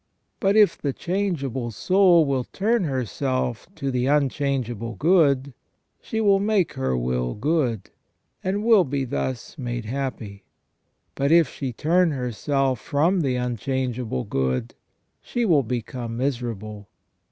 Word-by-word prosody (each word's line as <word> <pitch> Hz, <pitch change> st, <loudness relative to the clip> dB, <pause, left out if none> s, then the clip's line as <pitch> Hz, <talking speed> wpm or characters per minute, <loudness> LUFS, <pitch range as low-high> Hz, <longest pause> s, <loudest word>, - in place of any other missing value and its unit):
But 195 Hz, +1 st, +2 dB
if 210 Hz, -2 st, +5 dB
the 140 Hz, -2 st, -1 dB
changeable 145 Hz, -, -2 dB
soul 180 Hz, -, +4 dB
will 135 Hz, -3 st, -1 dB
turn 215 Hz, 0 st, 0 dB
herself 130 Hz, -2 st, -2 dB
to 135 Hz, -1 st, -3 dB
the 125 Hz, 0 st, 0 dB
unchangeable 135 Hz, -5 st, 0 dB
good, 140 Hz, -, +3 dB, 0.5 s
she 220 Hz, -, -3 dB
will 200 Hz, -3 st, +4 dB
make 200 Hz, -4 st, +1 dB
her 65 Hz, -1 st, -1 dB
will 60 Hz, 0 st, -1 dB
good, 125 Hz, -, -1 dB, 0.5 s
and 200 Hz, +3 st, -1 dB
will 220 Hz, -4 st, +6 dB
be 135 Hz, -2 st, -2 dB
thus 130 Hz, +4 st, -4 dB
made 120 Hz, -2 st, -4 dB
happy. 115 Hz, -5 st, -5 dB, 0.7 s
But 140 Hz, +2 st, 0 dB
if 165 Hz, -2 st, +6 dB
she 135 Hz, -2 st, -4 dB
turn 170 Hz, +8 st, +2 dB
herself 135 Hz, 0 st, -1 dB
from 170 Hz, +6 st, +1 dB
the 135 Hz, -4 st, 0 dB
unchangeable 125 Hz, -, -2 dB
good, 65 Hz, -1 st, -1 dB, 0.5 s
she 240 Hz, -1 st, -2 dB
will 160 Hz, -8 st, +4 dB
become 120 Hz, -1 st, -4 dB
miserable. 115 Hz, -6 st, -4 dB
135 Hz, 130 wpm, -24 LUFS, 120-165 Hz, 0.7 s, will